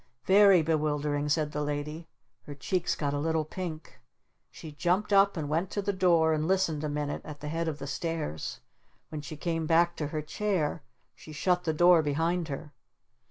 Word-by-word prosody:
"Very 195 -3 +6
bewildering," 150 -2 0
said 150 0 +1
the 150 - -3
Lady. 150 +3 -4 0.4
Her 145 - -7
cheeks 180 +6 -1
got 145 -2 -2
a 145 - -1
little 160 +1 0
pink. 160 -1 -7 0.5
She 160 - -10
jumped 180 +7 0
up 200 -1 +5
and 155 -2 -3
went 165 +5 -1
to 205 - -1
the 200 +1 0
door 170 -4 +3
and 155 0 -1
listened 175 -5 +1
a 150 - -1
minute 145 0 -3
at 150 -2 -9
the 150 - -5
head 165 +1 -2
of 155 -2 -2
the 140 - -7
stairs. 140 - -4 0.5
When 155 -1 -5
she 150 +1 -8
came 165 -1 -2
back 170 +1 +3
to 150 - -2
her 155 0 -4
chair 170 -2 -1 0.3
she 155 - -13
shut 180 +4 0
the 160 - +2
door 175 +1 +6
behind 165 +3 0
her. 145 0 -7
160 Hz, 190 wpm, -29 LUFS, 150-175 Hz, 0.5 s, Very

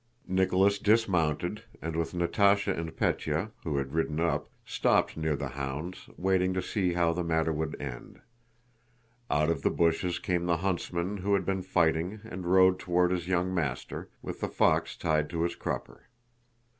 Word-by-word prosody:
Nicholas 95 +2 +3
dismounted, 100 -3 +1 0.2
and 80 0 -4
with 80 +1 -2
Natásha 100 +3 +3
and 80 -1 -5
Pétya, 80 +8 0
who 75 -4 -1
had 70 0 -2
ridden 80 -1 0
up, 85 0 0 0.2
stopped - - +2
near 80 -1 0
the 70 -1 -4
hounds, 70 +7 -5
waiting 95 0 +1
to 95 - 0
see 90 -2 0
how 85 -1 +2
the 90 +1 -2
matter 80 -1 +1
would 80 0 -3
end. 65 -4 -7 1.1
Out 75 +3 +2
of 75 -4 -2
the - - +2
bushes 85 +1 +1
came 90 -1 -1
the 85 -1 +2
huntsman 90 +1 -2
who 100 +1 +1
had 95 -2 -1
been 95 -1 0
fighting 90 +2 +1
and 90 -1 -6
rode 95 0 +5
toward 90 0 +2
his 90 -2 -2
young 90 0 +1
master, 75 -8 -3
with - - -6
the - - -1
fox - - +2
tied 75 -1 +1
to 85 -1 -1
his 85 0 -1
crupper. - - -5
85 Hz, 170 wpm, -29 LUFS, 80-95 Hz, 1.1 s, rode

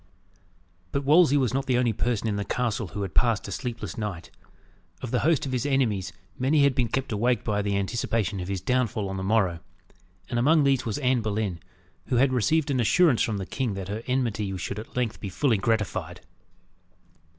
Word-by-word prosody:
But 140 - -1
Wolsey 150 0 +5
was 130 -4 +1
not 135 0 -1
the 125 -2 +2
only 120 -2 +2
person 115 0 -1
in 105 - 0
the 100 - -1
castle 115 0 -1
who 100 +4 -5
had 95 - -5
passed 115 -4 +2
a - - -6
sleepless 120 +1 -5
night. 105 -6 -5 0.7
Of 120 - -4
the 125 - +2
host 160 -2 +2
of 135 - -4
his 125 -2 -1
enemies 115 -9 0 0.3
many 140 +3 +3
had 140 -1 +4
been 125 -2 +1
kept 135 +3 -2
awake 115 +2 +1
by 105 -2 0
the 100 -1 0
anticipation 110 0 -1
of 90 - -5
his 95 -2 -3
downfall 120 -5 0
on 95 - -4
the 95 - -3
morrow; 95 -4 +1 0.7
and 120 - -1
among 150 +5 +4
these 135 -3 +2
was 110 - -2
Anne 130 -3 +1
Boleyn, 105 -5 -2 0.5
who 125 - 0
had 130 +2 +3
received 140 +6 +2
an 130 - +1
assurance 135 +3 +4
from 110 -3 0
the 95 - -4
king 120 -1 -2
that 95 -1 -6
her 105 +2 -3
enmity 110 -7 -1
should 100 +3 -4
at 110 - -11
length 120 -3 -1
be 100 - -5
fully 120 +2 +1
gratified. 95 -5 -1
115 Hz, 205 wpm, -26 LUFS, 100-130 Hz, 0.7 s, Wolsey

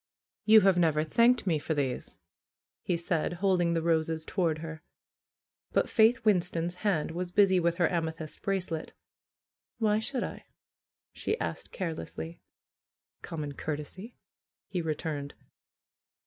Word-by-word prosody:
"You 220 0 +8
have 190 -2 +4
never 155 -3 +3
thanked 235 +9 +3
me 165 -5 +2
for 155 +2 -2
these," 135 -3 -2 0.6
he 175 - 0
said, 170 -1 -1
holding 175 -2 +2
the 165 - 0
roses 160 -1 +1
toward 170 -5 0
her. 160 0 -7 0.9
But - - +2
Faith 230 +1 +4
Winston's 175 -4 +2
hand 190 -9 +1
was 175 +1 -4
busy 190 -1 +5
with 170 -1 +1
her 175 -1 +3
ame 165 -2 0
thyst 160 -1 -8
bracelet. 185 -5 -2 0.8
"Why 215 -2 +2
should 250 +2 -2
I - - -6 0.4
?" - - - 0.3
she 440 - -2
asked - - -4
carelessly. 85 - -5 0.8
"Common 150 -3 -5
courtesy," 155 - -6 0.5
he 180 - -2
returned. 150 -3 -3
170 Hz, 135 wpm, -29 LUFS, 160-195 Hz, 0.9 s, You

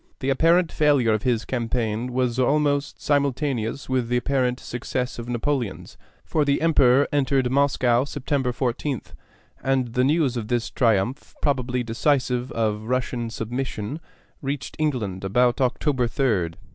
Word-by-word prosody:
The 135 - 0
apparent 165 +5 +3
failure 140 -7 +3
of 110 - 0
his 120 -2 0
campaign 115 -1 -2
was 125 -1 0
almost 145 +1 +1
simultaneous 140 -4 0
with 130 -2 0
the 125 +1 +1
apparent 125 -1 0
success 125 +1 -4
of 120 +1 -6
Napoleon's; 120 -2 -2 0.3
for 155 - +1
the 140 -1 +1
Emperor 140 -4 +4
entered 135 -3 +2
Moscow 130 -3 +3
September 140 -2 -1
14th, 130 +1 -3 0.5
and 130 -3 0
the 125 - +2
news 140 -3 +2
of 110 -3 -4
this 120 0 -1
triumph, 115 +2 0
probably 125 -3 0
decisive 125 +1 0
of 110 -2 0
Russian 125 -2 -1
submission, 120 +2 -4 0.4
reached 140 0 -4
England 115 -12 -1
about 120 +6 +2
October 130 0 +1
3d. 105 -11 0
125 Hz, 135 wpm, -24 LUFS, 120-140 Hz, 0.5 s, Emperor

